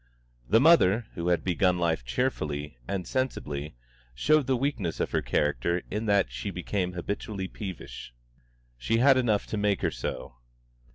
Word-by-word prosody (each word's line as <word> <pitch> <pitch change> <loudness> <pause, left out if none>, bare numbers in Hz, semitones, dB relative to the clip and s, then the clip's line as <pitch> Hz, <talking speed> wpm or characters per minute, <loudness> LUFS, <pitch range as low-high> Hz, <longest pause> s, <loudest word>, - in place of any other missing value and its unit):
The 115 - +6
mother, 120 - +5
who 85 0 -4
had 85 -2 +2
begun 90 0 +2
life 80 -6 0
cheerfully 75 - -2
and 90 -3 -3
sensibly, 75 - -3 0.4
showed 150 - +3
the 130 -1 +2
weakness 120 - -2
of - - -1
her - - +1
character 75 +5 0
in 105 +2 -2
that 100 -2 +3
she 100 - -4
became 90 0 -2
habitually 95 +2 -4
peevish. 95 - -8 0.7
She 115 - +1
had 135 +3 +6
enough 115 -5 +1
to 110 - -4
make 105 -1 +1
her - - +2
so. 60 -1 -5
95 Hz, 155 wpm, -28 LUFS, 85-115 Hz, 0.7 s, The